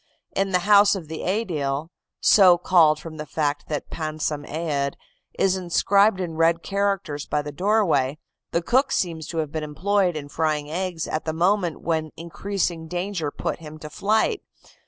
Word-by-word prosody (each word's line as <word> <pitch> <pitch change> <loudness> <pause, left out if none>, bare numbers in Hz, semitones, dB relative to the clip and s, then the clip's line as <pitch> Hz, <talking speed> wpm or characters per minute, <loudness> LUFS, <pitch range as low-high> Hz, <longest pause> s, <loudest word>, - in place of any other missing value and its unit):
In 195 0 +1
the 180 -1 +1
house 205 0 +6
of 165 -5 -7
the 160 - -5
Aedile 160 -7 -2 0.3
so 185 -4 +6
called 165 -4 +4
from 160 0 -9
the 150 - -5
fact 145 -2 -2
that 150 -2 -4
'Pansam 155 -2 -3
Aed.' 145 -3 -2 0.4
is 190 -1 +3
inscribed 190 +3 +3
in 170 -3 -4
red 165 +1 +3
characters 195 -7 -1
by 150 0 0
the 145 - -6
doorway 180 -6 +1 0.3
the 170 - -1
cook 260 +8 +2
seems 165 -4 -1
to 165 - -6
have 155 -3 -1
been 155 0 -3
employed 180 +4 0
in 145 -2 -5
frying 150 -1 -1
eggs 175 -1 -3
at 155 - -3
the 160 - -1
moment 175 0 +1
when 160 -2 -1
increasing 170 -1 -3
danger 175 -2 -2
put - - -4
him 155 -1 -10
to 150 0 -9
flight. 220 - +1
165 Hz, 170 wpm, -24 LUFS, 155-190 Hz, 0.4 s, house